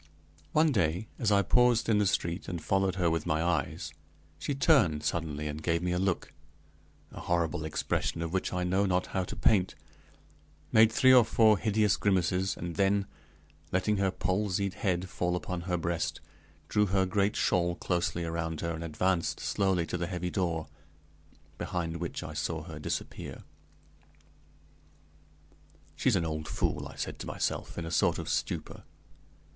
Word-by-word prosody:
One 155 0 +4
day 90 - 0
as 115 -5 +1
I 100 -1 +4
paused 125 +2 +3
in 110 -2 +3
the 105 - +3
street 85 0 -1
and 85 -2 -3
followed 95 +2 +1
her 90 -3 +1
with 80 -2 0
my 80 +1 +1
eyes, 85 -5 -1 0.5
she 145 - -2
turned 90 - +3
suddenly 75 -1 -2
and 75 +1 -5
gave 85 +2 0
me 90 - 0
a 90 - 0
look, 95 -1 -1 0.8
the - - -9
horrible 85 -3 0
expression 80 +1 -1
of 85 +1 -4
which 95 - -1
I 90 0 -1
know 95 +3 +2
not 90 0 +1
how 95 - +1
to - - -6
paint; 95 -4 +2 1.0
made 110 0 +6
three 130 +3 +6
or 125 -2 +8
four 110 -1 +4
hideous 105 -2 +2
grimaces, 95 -1 +1
and 85 -1 -5
then, 100 0 +2 0.7
letting 100 +3 +1
her 95 -1 +2
palsied 95 0 -1
head 95 -3 -1
fall 90 +3 -1
upon 90 0 -4
her 90 - +1
breast, 85 0 -2 0.5
drew 105 0 +2
her 95 0 +2
great 100 +2 +1
shawl 85 -1 +1
closely 85 -1 -1
around 80 -1 -3
her, 85 - -1
and 80 +1 -5
advanced 85 +2 0
slowly 95 -4 +1
to 90 - -3
the 85 0 -2
heavy 90 -1 -3
door, 85 -4 -1 0.9
behind 85 -2 -3
which 85 0 -4
I 80 0 -7
saw 75 - -2
her - - -8
disappear. - - -5 2.5
"She's - - +2
an 85 - +1
old 75 -1 -3
fool!" - - -1
I - - -12
said - - -5
to - - -6
myself, - - -3
in 85 - -3
a 80 - -5
sort - - +2
of - - -5
stupor. - - -2
90 Hz, 165 wpm, -30 LUFS, 85-100 Hz, 2.5 s, or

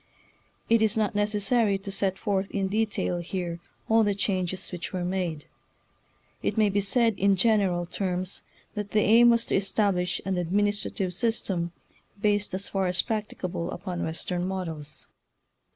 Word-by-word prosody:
It 230 -1 +4
is 220 0 +2
not 215 -2 +1
necessary 205 +1 +2
to 195 0 -7
set 195 -1 0
forth 195 -1 -1
in 195 -2 -1
detail 210 -4 0
here 175 -1 -4 0.3
all 225 0 +5
the 205 -1 +1
changes 190 -2 -1
which 180 -2 -5
were 180 -2 -2
made. 175 -5 -2 1.0
It - - -1
may 215 -2 +4
be 200 +1 +1
said 225 +1 +2
in 200 0 +4
gen 215 +3 +4
eral 175 -3 0
terms 185 0 -3 0.3
that 210 -1 -5
the 215 - +4
aim 230 +4 +6
was 235 -1 +3
to - - 0
establish 190 -2 +1
an 190 -1 -1
administrative 200 +1 0
system 190 -5 -1 0.5
based 205 -2 +1
as 195 +1 -3
far 195 -1 0
as 180 -1 +2
practicable 185 -5 -3
upon 180 -3 -4
Western 175 +2 -2
models. 160 -6 -5
195 Hz, 155 wpm, -27 LUFS, 180-210 Hz, 1.0 s, aim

